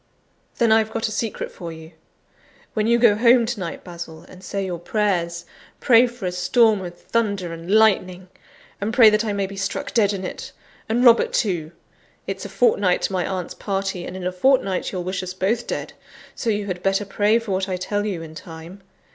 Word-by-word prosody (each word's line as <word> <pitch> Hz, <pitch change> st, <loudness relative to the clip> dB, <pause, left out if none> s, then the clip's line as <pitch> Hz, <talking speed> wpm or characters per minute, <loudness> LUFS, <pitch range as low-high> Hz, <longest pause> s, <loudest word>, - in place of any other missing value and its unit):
then 235 Hz, -2 st, +3 dB
I've 220 Hz, 0 st, +4 dB
got 225 Hz, 0 st, -2 dB
a -, -, -5 dB
secret 220 Hz, 0 st, -3 dB
for 170 Hz, -3 st, -8 dB
you. 160 Hz, 0 st, -11 dB, 0.8 s
When 215 Hz, 0 st, 0 dB
you 235 Hz, 0 st, +4 dB
go 235 Hz, -3 st, +5 dB
home 235 Hz, +2 st, +5 dB
to 235 Hz, -1 st, -3 dB
night, 170 Hz, -3 st, -5 dB
Basil, 170 Hz, -2 st, -9 dB
and 185 Hz, 0 st, -14 dB
say 195 Hz, +1 st, -3 dB
your 175 Hz, -2 st, -4 dB
prayers, 175 Hz, -3 st, -1 dB, 0.3 s
pray 245 Hz, 0 st, +5 dB
for 240 Hz, -4 st, -8 dB
a 180 Hz, -, -1 dB
storm 195 Hz, +4 st, +3 dB
of 175 Hz, -1 st, -7 dB
thunder 200 Hz, -7 st, -1 dB
and 165 Hz, +1 st, -9 dB
lightning; 190 Hz, -4 st, +3 dB, 0.5 s
and 220 Hz, +3 st, -2 dB
pray 225 Hz, -4 st, +8 dB
that 215 Hz, +1 st, +2 dB
I 215 Hz, -, -1 dB
may 200 Hz, -1 st, -1 dB
be 195 Hz, +1 st, -8 dB
struck 195 Hz, -, -3 dB
dead 210 Hz, -4 st, +3 dB
in 190 Hz, -2 st, -4 dB
it, -, -, -7 dB, 0.4 s
and 240 Hz, +3 st, +2 dB
Robert 235 Hz, -1 st, +6 dB
too. 170 Hz, -7 st, -1 dB, 0.5 s
It's 195 Hz, 0 st, -5 dB
a -, -, -6 dB
fortnight 195 Hz, -2 st, +2 dB
to -, -, -1 dB
my 180 Hz, -1 st, 0 dB
aunt's 185 Hz, -3 st, -4 dB
party; 195 Hz, -2 st, -3 dB
and 185 Hz, -, -7 dB
in 185 Hz, -, -6 dB
a 180 Hz, -, 0 dB
fortnight 195 Hz, -2 st, +1 dB
you'll 185 Hz, -2 st, -3 dB
wish 185 Hz, +1 st, -3 dB
us 185 Hz, 0 st, -6 dB
both 215 Hz, +6 st, -1 dB
dead, -, -, -4 dB, 0.4 s
so 235 Hz, -, -3 dB
you 205 Hz, -1 st, 0 dB
had 180 Hz, -3 st, -4 dB
better 195 Hz, +2 st, +1 dB
pray 205 Hz, +3 st, +2 dB
for 230 Hz, -3 st, -4 dB
what 190 Hz, +1 st, -1 dB
I 185 Hz, -, -1 dB
tell 205 Hz, +3 st, -2 dB
you 190 Hz, -6 st, -3 dB
in 160 Hz, -1 st, -10 dB
time. 165 Hz, +4 st, -10 dB
195 Hz, 210 wpm, -22 LUFS, 180-220 Hz, 0.8 s, pray